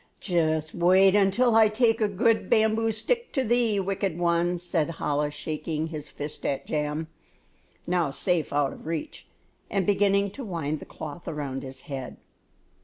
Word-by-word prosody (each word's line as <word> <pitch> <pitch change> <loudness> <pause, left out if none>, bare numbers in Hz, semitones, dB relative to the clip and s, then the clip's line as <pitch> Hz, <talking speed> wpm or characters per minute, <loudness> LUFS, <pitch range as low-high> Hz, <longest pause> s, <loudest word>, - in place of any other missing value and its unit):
"Just 160 -4 0
wait 185 +2 +5
until 205 +4 +3
I 220 -1 +7
take 225 +1 +2
a 215 - +4
good 220 +3 +1
bamboo 220 +1 +3
stick 470 - -1
to 265 - +1
thee, 235 -3 +2
wicked 195 -2 -2
one," 175 0 +1
said 170 -2 -1
Chola, 150 0 0
shaking 155 +1 -4
his 150 -2 -7
fist 145 +1 -6
at 135 - -2
Jam, 150 +1 -2 0.8
now 175 -4 +1
safe 170 +3 0
out 145 -1 +1
of - - -12
reach, 165 -2 -5 0.4
and 195 -3 0
beginning 200 0 +2
to 270 - -8
wind 160 -7 -3
the - - -10
cloth 155 +2 -9
around 145 -4 -4
his 130 -1 -8
head. 135 -5 -7
175 Hz, 160 wpm, -26 LUFS, 155-205 Hz, 0.8 s, I